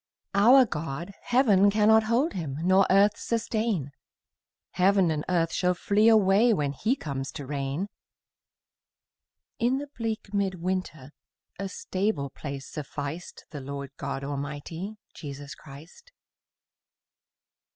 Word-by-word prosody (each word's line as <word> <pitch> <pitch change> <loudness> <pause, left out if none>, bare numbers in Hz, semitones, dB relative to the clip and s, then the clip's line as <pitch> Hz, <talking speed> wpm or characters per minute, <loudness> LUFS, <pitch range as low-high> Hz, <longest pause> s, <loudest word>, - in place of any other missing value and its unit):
Our 245 +7 +7
God, 165 - -5
heaven 210 -6 +4
cannot 215 +1 +4
hold 245 +9 +1
Him, 150 -7 -4
Nor 185 +2 +4
earth 200 +2 +4
sustain; 220 - -1 0.8
Heaven 190 -2 +3
and 150 -1 -2
earth 165 -2 +1
shall 180 -1 +1
flee 205 +4 +2
away 220 +1 +5
When 145 -4 -1
He 220 - 0
comes 140 - -5
to 145 - -6
reign: 140 +6 -3 1.7
In 245 +3 +2
the 285 +1 -6
bleak 220 -3 -4
mid 200 -2 0
winter 175 -6 -4 0.5
A 195 0 -3
stable 185 -9 -2
place 140 -2 -7
sufficed 150 +2 -6
The 145 - -6
Lord 140 0 -6
God 135 - -4
Almighty, 145 +8 -5 0.2
Jesus 145 -1 -8
Christ. 155 - -14
185 Hz, 120 wpm, -27 LUFS, 145-215 Hz, 1.7 s, Our